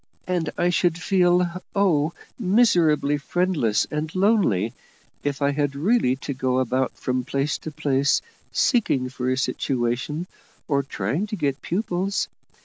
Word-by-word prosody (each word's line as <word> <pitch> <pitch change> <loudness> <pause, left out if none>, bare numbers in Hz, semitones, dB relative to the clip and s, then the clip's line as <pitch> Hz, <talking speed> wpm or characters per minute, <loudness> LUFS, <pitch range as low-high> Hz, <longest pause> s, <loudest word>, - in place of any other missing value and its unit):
And 180 -3 -1
I 175 0 +2
should 175 -1 +2
feel, 180 -1 +2
oh! 170 -6 +2 0.3
miserably 175 -9 +3
friendless 150 - +1
and 150 +1 -2
lonely 185 - +2 0.5
if 145 0 -2
I 140 - +3
had 145 -1 -1
really 155 - +2
to 140 - -2
go 130 -1 0
about 130 +1 0
from 125 0 -2
place 140 +3 -1
to - - -6
place 140 -2 +2 0.3
seeking 140 - +2
for 125 0 -3
a 130 - +1
situation, 130 +5 -1 0.4
or 140 -3 +2
trying 135 - -2
to 210 - -4
get 145 -6 -1
pupils. 190 0 -1
150 Hz, 140 wpm, -24 LUFS, 130-180 Hz, 0.5 s, miserably